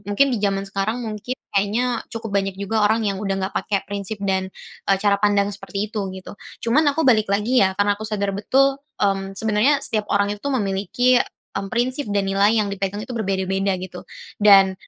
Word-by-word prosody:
mungkin 265 Hz, +7 st, +3 dB
di 230 Hz, -, -1 dB
zaman 195 Hz, -1 st, 0 dB
sekarang, 200 Hz, +3 st, -2 dB
mungkin 220 Hz, +3 st, -5 dB, 0.2 s
kayaknya 225 Hz, +5 st, +1 dB
cukup 225 Hz, -1 st, -6 dB
banyak 195 Hz, 0 st, -4 dB
juga 210 Hz, +2 st, -1 dB
orang 220 Hz, +1 st, +1 dB
yang 200 Hz, -2 st, -1 dB
udah 195 Hz, -2 st, -1 dB
nggak 195 Hz, -, -10 dB
pakai 200 Hz, -1 st, 0 dB
prinsip 205 Hz, +1 st, -5 dB
dan, 190 Hz, -1 st, 0 dB, 0.4 s
eee, 195 Hz, -, +5 dB
cara 200 Hz, 0 st, +2 dB
pandang 205 Hz, -1 st, +2 dB
seperti 205 Hz, +1 st, -5 dB
itu, 205 Hz, -3 st, -2 dB
gitu. 190 Hz, 0 st, -9 dB, 0.3 s
Cuman 245 Hz, +7 st, +3 dB
aku, 320 Hz, +3 st, -1 dB
balik 220 Hz, -5 st, +4 dB
lagi 210 Hz, +6 st, +2 dB
ya, 190 Hz, -1 st, +1 dB
karena 205 Hz, 0 st, +3 dB
aku 205 Hz, -, -10 dB
sadar 205 Hz, -2 st, -2 dB
betul, 270 Hz, +7 st, +3 dB, 0.2 s
mmm, 195 Hz, -1 st, -1 dB
sebenarnya 220 Hz, +6 st, +2 dB
setiap 215 Hz, -2 st, -2 dB
orang 205 Hz, 0 st, +2 dB
itu 210 Hz, +7 st, -9 dB
memiliki, 210 Hz, +1 st, +1 dB, 0.4 s
mmm, 195 Hz, 0 st, -4 dB
prinsip 255 Hz, +1 st, -1 dB
dan 200 Hz, -1 st, 0 dB
nilai 200 Hz, +3 st, +3 dB
yang 210 Hz, -, +1 dB
dipegang 195 Hz, +1 st, -3 dB
itu 255 Hz, -, -6 dB
berbeda-beda 195 Hz, -2 st, 0 dB
gitu. 180 Hz, -1 st, -8 dB, 0.4 s
Dan, 195 Hz, -2 st, +6 dB
205 Hz, 190 wpm, -22 LUFS, 195-225 Hz, 0.4 s, Dan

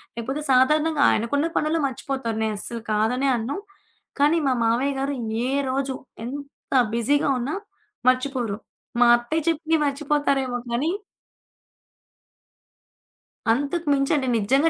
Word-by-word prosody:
లేకపోతే 260 Hz, +6 st, -3 dB
సాధారణంగా 300 Hz, +4 st, +3 dB
ఆయనకున్న 285 Hz, +8 st, +1 dB
పనుల్లో 310 Hz, +2 st, +1 dB
మర్చిపోతారు. 260 Hz, -3 st, -3 dB
నేను 215 Hz, -1 st, -1 dB
అస్సలు 235 Hz, +2 st, -5 dB
కాదనే 235 Hz, +6 st, +1 dB
అన్నాను. 235 Hz, +6 st, -3 dB, 0.6 s
కానీ, 295 Hz, +4 st, +4 dB
మా -, -, +3 dB
మావయ్య 250 Hz, +5 st, +2 dB
గారు 280 Hz, +1 st, -1 dB, 0.3 s
ఏ -, -, -1 dB, 0.2 s
రోజు, 270 Hz, 0 st, -1 dB, 0.3 s
ఎంత 280 Hz, +2 st, -8 dB, 0.2 s
బిజీగా 285 Hz, +6 st, +2 dB
ఉన్నా 260 Hz, +5 st, -2 dB, 0.5 s
మర్చిపోరు. 255 Hz, -5 st, 0 dB, 0.4 s
మా 245 Hz, -, +7 dB
అత్తయ్య 290 Hz, +7 st, -2 dB
చెప్పిని 325 Hz, 0 st, +2 dB
మర్చిపోతారేమో 280 Hz, -3 st, 0 dB
కానీ 245 Hz, +7 st, 0 dB, 2.6 s
అంతకు 290 Hz, +6 st, -2 dB
మించండి 275 Hz, 0 st, +1 dB
నిజంగా 270 Hz, +10 st, +3 dB
275 Hz, 110 wpm, -24 LUFS, 240-290 Hz, 2.6 s, మా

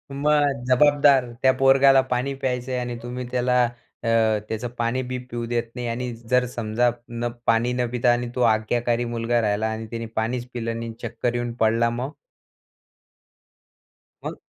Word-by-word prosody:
मग 145 Hz, -2 st, +2 dB
जबाबदार 140 Hz, -1 st, +4 dB
त्या 130 Hz, -, +5 dB
पोरगाला 135 Hz, 0 st, +6 dB
पाणी 125 Hz, +3 st, 0 dB
प्यायचं 130 Hz, -1 st, -3 dB
आहे 125 Hz, -, -1 dB
आणि 120 Hz, -1 st, -4 dB
तुम्ही 125 Hz, +1 st, -5 dB
त्याला 125 Hz, 0 st, +2 dB
अ, 120 Hz, 0 st, -9 dB, 0.4 s
त्याचं 110 Hz, +2 st, -3 dB
पाणी 120 Hz, +2 st, 0 dB
बी 125 Hz, -, -2 dB
पिऊ 120 Hz, -1 st, -3 dB
देत 120 Hz, -1 st, 0 dB
नाही 125 Hz, -1 st, -4 dB
आणि 120 Hz, +1 st, -3 dB, 0.2 s
जर 125 Hz, 0 st, +3 dB
समजा 120 Hz, +1 st, +1 dB, 0.6 s
पाणी 115 Hz, +2 st, +3 dB
न 125 Hz, -1 st, 0 dB
पिता 125 Hz, 0 st, +3 dB
आणि 120 Hz, 0 st, -2 dB
तो 125 Hz, -, -1 dB
आज्ञाकारी 120 Hz, +1 st, +1 dB
मुलगा 120 Hz, 0 st, 0 dB
राहिला 105 Hz, +1 st, 0 dB
आणि 110 Hz, 0 st, -5 dB
त्याने 115 Hz, 0 st, -4 dB
पाणीच 120 Hz, +2 st, -1 dB
पिलं 115 Hz, -1 st, -3 dB
नाही 115 Hz, -, -5 dB
आणि 115 Hz, -, -8 dB
चक्कर 120 Hz, +1 st, -2 dB
येऊन 120 Hz, -1 st, -2 dB
पडला, 115 Hz, +1 st, +3 dB
मग? 125 Hz, +5 st, -4 dB, 2.1 s
मग -, -, -5 dB
120 Hz, 160 wpm, -23 LUFS, 115-125 Hz, 2.1 s, पोरगाला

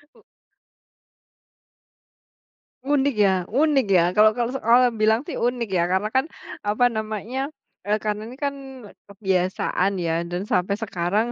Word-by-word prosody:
U -, -, -22 dB, 2.6 s
Unik 280 Hz, -2 st, +1 dB
ya 200 Hz, -2 st, +4 dB, 0.2 s
unik 275 Hz, 0 st, +2 dB
ya. 180 Hz, -3 st, +4 dB
Kalau 215 Hz, +2 st, +4 dB
kalau 240 Hz, 0 st, -1 dB
orang 240 Hz, 0 st, +3 dB
bilang 220 Hz, +2 st, +3 dB
sih, -, -, -4 dB
unik 240 Hz, -2 st, -1 dB
ya. 175 Hz, -2 st, +2 dB
Karena 195 Hz, +3 st, 0 dB
kan, 265 Hz, +2 st, +2 dB, 0.4 s
apa 215 Hz, +4 st, +2 dB
namanya, 220 Hz, +5 st, -3 dB, 0.4 s
eee, 210 Hz, -, +3 dB
karena 210 Hz, +1 st, -3 dB
ini 250 Hz, -, -10 dB
kan, 280 Hz, 0 st, -2 dB, 0.5 s
kebiasaan 190 Hz, -1 st, 0 dB
ya. 165 Hz, -1 st, 0 dB
Dan 175 Hz, +2 st, -4 dB
sampai 185 Hz, +2 st, +1 dB
sekarang, 200 Hz, +5 st, -1 dB
215 Hz, 135 wpm, -23 LUFS, 195-245 Hz, 2.6 s, ya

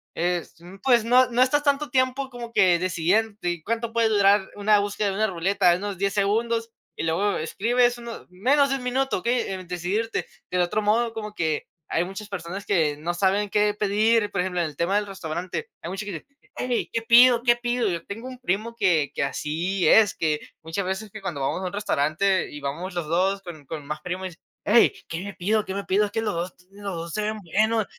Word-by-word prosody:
es, 175 Hz, 0 st, -1 dB
mm, 180 Hz, +3 st, -12 dB
pues 240 Hz, -4 st, +4 dB
no 250 Hz, +1 st, +5 dB
no 245 Hz, +2 st, +2 dB
estás 290 Hz, +3 st, +2 dB
tanto 285 Hz, -1 st, +1 dB
tiempo, 260 Hz, +1 st, +1 dB
como 235 Hz, -1 st, -8 dB
que 175 Hz, -2 st, +4 dB
decidiéndote, 185 Hz, 0 st, 0 dB
¿cuánto 230 Hz, 0 st, -2 dB
puede 230 Hz, -1 st, +3 dB
durar 200 Hz, -1 st, +4 dB
una 205 Hz, 0 st, +3 dB
búsqueda 205 Hz, 0 st, -1 dB
de -, -, -2 dB
una 215 Hz, +1 st, +2 dB
ruleta? 180 Hz, 0 st, +2 dB
Unos 200 Hz, 0 st, -4 dB
10 200 Hz, 0 st, 0 dB
segundos, 225 Hz, +3 st, 0 dB, 0.2 s
y -, -, -4 dB
luego 185 Hz, +6 st, +1 dB
escribes 240 Hz, +9 st, +1 dB
1, 235 Hz, -1 st, -8 dB
menos 270 Hz, +10 st, +2 dB
de 270 Hz, -, +1 dB
1 255 Hz, -, -5 dB
minuto, 265 Hz, -2 st, 0 dB
okey, 240 Hz, -1 st, 0 dB
en 185 Hz, -2 st, -6 dB
decidirte. 185 Hz, +6 st, -2 dB, 0.3 s
Del 180 Hz, 0 st, +2 dB
otro 175 Hz, +5 st, 0 dB
modo, 225 Hz, +2 st, +1 dB
como 210 Hz, -1 st, -6 dB
que 160 Hz, -4 st, -1 dB, 0.2 s
hay 170 Hz, -, +1 dB
muchas 205 Hz, +2 st, -8 dB
personas, 195 Hz, +1 st, -6 dB
que 155 Hz, -6 st, +1 dB
no 170 Hz, +3 st, -3 dB
saben 200 Hz, +2 st, +1 dB
qué 210 Hz, 0 st, +3 dB
pedir, 210 Hz, +2 st, +2 dB
por 195 Hz, -, 0 dB
ejemplo, 180 Hz, -1 st, -2 dB
en -, -, +1 dB
el 150 Hz, -, -9 dB
tema 175 Hz, +4 st, +1 dB
del 210 Hz, 0 st, +2 dB
restaurante, 185 Hz, -, -5 dB
hay 170 Hz, -, -4 dB
mucha 195 Hz, +2 st, -5 dB
que 200 Hz, -, -5 dB
dice: 160 Hz, -, -7 dB, 0.3 s
"¡Hey! 250 Hz, -1 st, -1 dB
¿Qué 230 Hz, -, 0 dB
pido? 240 Hz, +1 st, +6 dB
¿Qué 240 Hz, -1 st, +5 dB
pido?". 240 Hz, -2 st, 0 dB
Yo 170 Hz, -1 st, -3 dB
tengo 225 Hz, +5 st, -7 dB
un 255 Hz, -1 st, -9 dB
primo, 230 Hz, +1 st, -2 dB
que 175 Hz, -9 st, +2 dB
que -, -, 0 dB
así 170 Hz, +7 st, -1 dB
es, 215 Hz, -4 st, +6 dB
que 155 Hz, -2 st, 0 dB, 0.2 s
muchas 165 Hz, +4 st, -3 dB
veces, 190 Hz, +2 st, -4 dB
que 215 Hz, -, -9 dB
cuando 170 Hz, -8 st, -4 dB
vamos 135 Hz, +7 st, -1 dB
a -, -, -4 dB
un 180 Hz, -, -7 dB
restaurante 190 Hz, 0 st, +1 dB
y 145 Hz, -, -8 dB
vamos 170 Hz, +7 st, -4 dB
los 170 Hz, -3 st, -2 dB
2, 190 Hz, +4 st, +1 dB
con 155 Hz, -5 st, -10 dB
con 150 Hz, -2 st, -6 dB
más 150 Hz, 0 st, -4 dB
primos, 180 Hz, +2 st, -4 dB
y -, -, -7 dB
dice: 160 Hz, -, -18 dB, 0.3 s
"Hey, 230 Hz, +3 st, +5 dB, 0.2 s
¿qué 165 Hz, +2 st, -4 dB
me 205 Hz, -1 st, -6 dB
pido? 210 Hz, +4 st, 0 dB
¿Qué 190 Hz, -, -5 dB
me 200 Hz, -, -3 dB
pido? 205 Hz, +3 st, +2 dB
Es 200 Hz, -, -7 dB
que 225 Hz, 0 st, -1 dB
los 210 Hz, -4 st, -1 dB
2, 170 Hz, +1 st, -3 dB, 0.2 s
los 200 Hz, -2 st, -6 dB
2 165 Hz, 0 st, -6 dB
se 215 Hz, -, -1 dB
ven 215 Hz, 0 st, -2 dB
buenos". 215 Hz, +5 st, +1 dB
200 Hz, 225 wpm, -25 LUFS, 175-225 Hz, 0.3 s, pido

